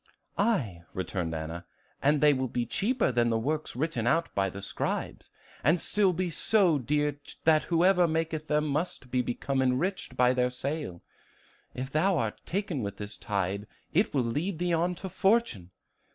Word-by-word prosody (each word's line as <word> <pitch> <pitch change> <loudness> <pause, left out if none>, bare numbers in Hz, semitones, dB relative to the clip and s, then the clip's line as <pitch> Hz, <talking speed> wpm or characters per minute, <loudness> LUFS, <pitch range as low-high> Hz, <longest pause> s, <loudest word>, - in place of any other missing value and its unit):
"Aye," 140 - 0
returned 90 -3 -2
Anna, 80 +2 -5 0.4
"and 145 +1 +3
they 150 -1 +6
will 130 -1 -1
be 120 0 -2
cheaper 230 - +1
than 120 -1 +2
the 115 - +2
works 150 +7 -2
written 125 -4 -1
out 165 +6 +1
by 95 -1 +1
the 95 - -8
scribes, - - -3 0.3
and 160 +4 +4
still 200 +1 +3
be 180 0 -2
so 180 -4 +3
dear 145 +2 0 0.2
that 155 -1 +4
whoever 175 +1 +4
maketh 160 -1 -2
them 150 0 +2
must 145 -3 -2
become 130 +2 0
enriched 130 +2 -1
by 125 0 +5
their 125 0 +2
sale. 130 - -4 0.7
If 130 +2 -4
thou 175 +5 +2
art 110 -6 -2
taken 185 -7 -2
with 100 -2 -4
this 105 0 -7
tide, 100 0 -2 0.3
it 195 +7 +3
will 135 -3 +1
lead 155 +10 -2
thee 175 +1 0
on 175 +2 +1
to 190 - -6
fortune. 190 - +1
145 Hz, 165 wpm, -29 LUFS, 120-175 Hz, 0.7 s, they